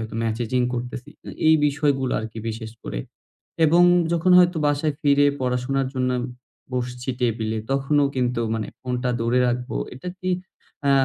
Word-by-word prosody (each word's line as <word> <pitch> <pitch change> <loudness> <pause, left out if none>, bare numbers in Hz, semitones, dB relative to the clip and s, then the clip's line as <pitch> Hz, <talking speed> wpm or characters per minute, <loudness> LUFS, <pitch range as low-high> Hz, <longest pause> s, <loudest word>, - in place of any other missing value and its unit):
হয়তো 110 0 -6
ম্যাসেজিং 115 +2 0
করতেছি। 125 +1 -5 0.4
এই 160 - +7
বিষয়গুলো 140 -3 +1
আরকি 110 0 -7
বিশেষ 110 0 -5
করে। - - -4 0.7
এবং 170 +3 +5 0.3
যখন 170 +2 +2
হয়তো 175 -1 +5
বাসায় 145 +1 +1
ফিরে 145 -1 +4
পড়াশোনার 130 +2 0
জন্য 130 -1 0
আম 120 - -2 0.5
বসছি 125 +1 -3
টেবিলে, 110 -2 0
তখনও 140 +1 +2
কিন্তু 125 -1 0
মানে 110 - -2
ফোনটা 125 -1 -2
দূরে 115 +2 +2
রাখবো। 125 - -2 0.2
এটা 180 +7 -6
কি 185 0 -1 0.6
আ - - +5
125 Hz, 145 wpm, -23 LUFS, 120-145 Hz, 0.7 s, এই